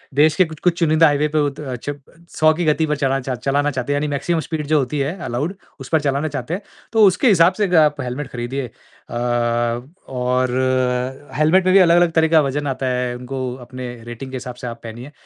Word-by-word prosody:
देश 150 +1 +4
के 185 - +4
कुछ-कुछ 165 +2 -1
चुनिंदा 160 0 +4
हाईवे 145 +1 +2
पे 155 0 0
वो 145 -1 +2
त 140 - -13
अ, 135 -4 -5
चप 145 +4 -6 0.4
100 155 0 +5
की 170 +1 -2
गति 155 +1 +2
पर 150 - 0
चलाना 135 -1 +1
चाह 130 0 -3
चलाना 140 +4 0
चाहते 130 +2 -2
हैं - - 0
यानी 150 +1 0
मैक्सिमम 160 +4 -1
स्पीड 155 -2 -4
जो 155 -1 +3
होती 140 +2 -2
है 145 +6 -1
अलाउड, 140 +10 -2 0.2
उस 135 - -9
पर 160 -2 +2
चलाना 140 +2 0
चाहते 145 +2 -4
हैं 195 - -3 0.3
तो 220 -1 +5
उसके 190 +8 +2
हिसाब 180 -3 +5
से 210 - -1
अग 180 - 0
आप 150 -2 +4
हेलमेट 130 +3 -4
खरीदिए 125 +2 -4 0.4
अ, 120 - -4 0.9
और 125 0 0 0.9
हेलमेट 170 +5 +4
में 185 - +4
भी 195 - +7
अलग-अलग 175 -1 +5
तरह 160 0 +3
का 160 -1 +5
वजन 145 +1 -2
आता 135 0 -2
है 125 -1 -1
उनको 125 0 -5
अपने 125 0 -7
रेटिंग 120 +3 -8
के - - -6
हिसाब 125 -1 -7
से 125 0 -7
आप 115 0 -7
पहनिए। 120 +5 -9
145 Hz, 230 wpm, -20 LUFS, 130-160 Hz, 0.9 s, भी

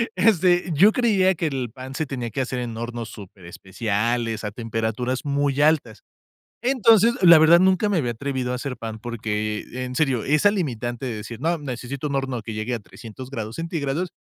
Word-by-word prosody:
este, 180 -2 +3
yo 190 +9 +6
creía 195 -6 +3
que 165 0 -1
el 130 -5 -3
pan 130 +1 -9
se 160 - -1
tenía 125 -4 -4
que 115 - -2
hacer 130 -1 -3
en 120 -2 -5
hornos 115 0 -5
superespeciales, 105 +4 -3
a 105 - -3
temperaturas 115 +3 -3
muy 140 0 0
altas. 150 -7 +1 0.6
Entonces, 230 -3 +4
la 170 -3 +9
verdad, 160 +2 +7
nunca 190 +3 +3
me 205 -3 +1
había 125 -7 0
atrevido 130 +1 -3
a - - -1
hacer 125 0 -5
pan 110 -1 -6
porque, 110 -2 -3 0.2
en 125 - -6
serio, 130 -6 +1
esa 150 +8 +3
limitante 125 - -3
de 125 - -3
decir: 110 +2 -8
"No, 165 +5 0
necesito 135 0 -5
un 140 - -3
horno 135 -3 -2
que 110 +1 -7
llegue 110 +3 -3
a 120 - -2
300 115 +5 -11
grados 115 -4 -6
centígrados", 165 0 -2
130 Hz, 185 wpm, -23 LUFS, 115-160 Hz, 0.6 s, la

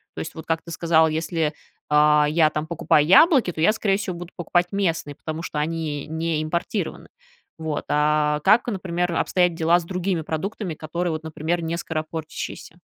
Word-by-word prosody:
То - - -6
есть, 160 - -6
вот, 160 - -8
как 165 0 -1
ты 170 - -10
сказал, 160 -1 +3
если, 160 0 -1 0.4
э, 150 0 +5
я 155 0 +3
там 155 0 -4
покупаю 155 -2 +2
яблоки, 255 - +6
то 160 - -5
я 180 - +5
скорее 205 -3 0
всего, 190 -4 -4
буду 175 0 -9
покупать 175 0 +1
местные, 165 -7 -1
потому 160 +2 -6
что 150 - -4
они 155 -2 -3
не 160 0 -2
импортированы. 170 +3 -3 0.5
Вот, 160 -2 -3
а 150 0 +2
как, 215 +6 +5
например, 180 -5 -2
обстоят 180 +1 +2
дела 165 +1 +3
с - - -8
другими 180 -1 -2
продуктами, 175 +4 -4
которые, 170 +3 -3
вот, 155 0 -4
например, 160 +2 -2
не 165 +1 -2
скоропортящиеся? 160 -1 -5
165 Hz, 175 wpm, -23 LUFS, 155-175 Hz, 0.5 s, яблоки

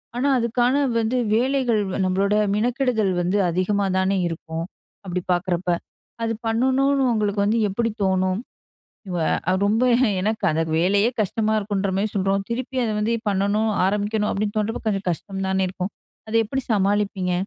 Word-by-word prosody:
ஆனா, 250 +3 0
அதுக்கான 240 +2 +1 0.2
வந்து 225 +3 0 0.2
வேலைகள் 245 -2 +2 0.2
நம்மளோட 195 +3 +1 0.2
மெனக்கிடுதல் 240 -3 +1
வந்து 180 +4 0
அதிகமா 195 +3 0
தானே 190 +1 +1
இருக்கும். 165 0 -5 0.4
அப்டி 180 0 -2
பார்க்குறப்ப 180 0 -1 0.5
அது 225 - 0
பண்ணணும்னு 265 +4 +2
உங்களுக்கு 210 -2 0
வந்து 220 +3 +2
எப்டி 230 +4 -1
தோணும். 185 0 +1 1.1
ஆ - - +4
ரொம்ப 220 +4 +2 0.4
எனக்கு 215 +3 -1
அந்த 160 +1 0 0.2
வேலையே 200 +6 +3
கஷ்டமா 215 +2 0
இருக்குன்ற 200 -1 -2
மாரி 210 +2 0
சொல்றோம் 195 0 0
திருப்பி 255 +2 -3
அத 220 - -1
வந்து 220 +2 0 0.2
பண்ணணும் 205 +3 +1 0.2
ஆரம்பிக்கணும் 210 +1 0
அப்டின்னு 205 +1 -2
தோண்றப்போ 215 +2 -1
கொஞ்சம் 195 -2 -1
கஷ்டம் 195 +3 -5
தானே 190 0 +1
இருக்கும். 185 +1 -4 0.4
அத 220 - -4
எப்படி 265 +5 -2
சமாளிப்பீங்க? 195 -2 +1
205 Hz, 140 wpm, -23 LUFS, 190-225 Hz, 1.1 s, ஆ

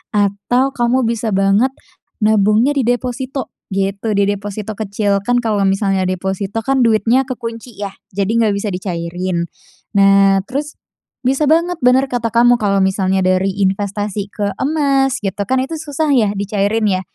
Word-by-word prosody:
atau 205 +6 +1
kamu 245 +1 +1
bisa 225 -2 -1
banget, 195 +6 +3 0.5
nabungnya 215 +4 +3
di 275 - +1
deposito 250 +2 -2 0.2
gitu, 195 +3 -1
di 200 -1 +2
deposito 205 +1 -4
kecil. 200 -1 -1
Kan 245 +3 +2
kalau 215 -4 0
misalnya 195 0 +1
deposito 190 +3 -2
kan 265 +2 +1
duitnya 230 +3 +3
kekunci 230 -3 -7
ya 200 -1 -4 0.2
jadi 195 0 -1
nggak 225 -1 +2
bisa 200 +2 -3
dicairin, 175 -1 -3 0.5
nah 195 0 +5
terus, 295 +3 -4 0.5
bisa 265 +4 +1
banget 340 +2 +2
bener 255 +2 +4
kata 240 -3 -2
kamu 240 +2 +5
kalau 200 -3 +1
misalnya 190 0 +1
dari 185 +1 +2
investasi 200 +1 -2
ke 200 -2 -3
emas 275 -3 +1
gitu 195 -2 -3
kan 260 +5 0
itu 320 +5 -5
susah 310 0 -3
ya 215 -5 +3
dicairin 205 +2 0
ya, 185 -2 +1
210 Hz, 150 wpm, -17 LUFS, 195-245 Hz, 0.5 s, nah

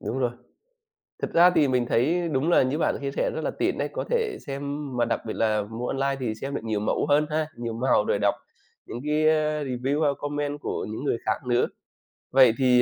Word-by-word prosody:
Đúng 130 - -3
rồi. 125 -2 +1 0.9
Thực - - -3
ra 175 +2 +7
thì 145 - +4
mình 125 -2 +1
thấy 165 +8 +2
đúng 145 +3 0
là - - +5
như 130 +4 -1
bạn - - +1
chia 140 - -2
sẻ, - - -1
rất - - -2
là - - -1
tiện - - -1
đấy, - - -1
có - - -2
thể 465 -3 0
xem 140 0 -4 0.4
mà 120 - +3
đặc 115 - -1
biệt 110 - -3
là 110 -1 +1
mua 115 +4 -5
online 135 0 0
thì 110 -4 -2
xem 140 +5 -5
được - - -3
nhiều 110 -2 -1
mẫu 105 - 0
hơn 150 +1 +4
ha, 155 0 0
nhiều 115 -1 -4
màu, 115 -2 +2
rồi 100 - +1
đọc 100 -1 +2 0.5
những 120 - -6
cái 150 0 -1 0.5
review 135 +4 -1
ha, 145 - +4
comment 145 0 -3
của - - -3
những 110 +6 -5
người 130 - 0
khác 110 +4 -1
nữa. 120 0 +2 0.7
Vậy 130 -3 +6
thì, 125 -2 +4
130 Hz, 230 wpm, -25 LUFS, 115-145 Hz, 0.9 s, ra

